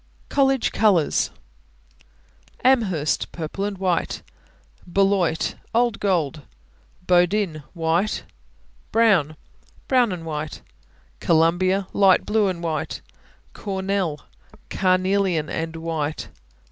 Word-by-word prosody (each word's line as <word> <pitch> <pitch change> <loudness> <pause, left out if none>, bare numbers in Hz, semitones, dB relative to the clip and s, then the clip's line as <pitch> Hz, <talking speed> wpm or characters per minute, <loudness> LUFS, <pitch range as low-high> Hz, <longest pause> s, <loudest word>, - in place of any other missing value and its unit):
COLLEGE 270 -2 +2
COLORS. 195 -8 +2 1.3
Amherst 205 - +2
Purple 170 +4 -4
and 205 -1 -4
white. 185 -3 -1 0.7
Beloit 195 -4 +2 0.2
Old 235 -2 +2
gold, 165 -6 0 0.6
Bowdoin 180 -2 +2
White. 170 +5 0 0.7
Brown 190 -10 +3 0.5
Brown 250 -5 +3
and 170 -3 -5
white. 155 -1 -5 0.6
Columbia 175 +4 +2
Light 195 -2 +4
blue 210 -1 +2
and 175 -2 -3
white. 160 -2 -3 0.5
Cornell 190 -5 -2 0.5
Carnelian 185 -3 +1
and 165 0 -3
white. 160 -2 -3
185 Hz, 85 wpm, -23 LUFS, 165-200 Hz, 1.3 s, Light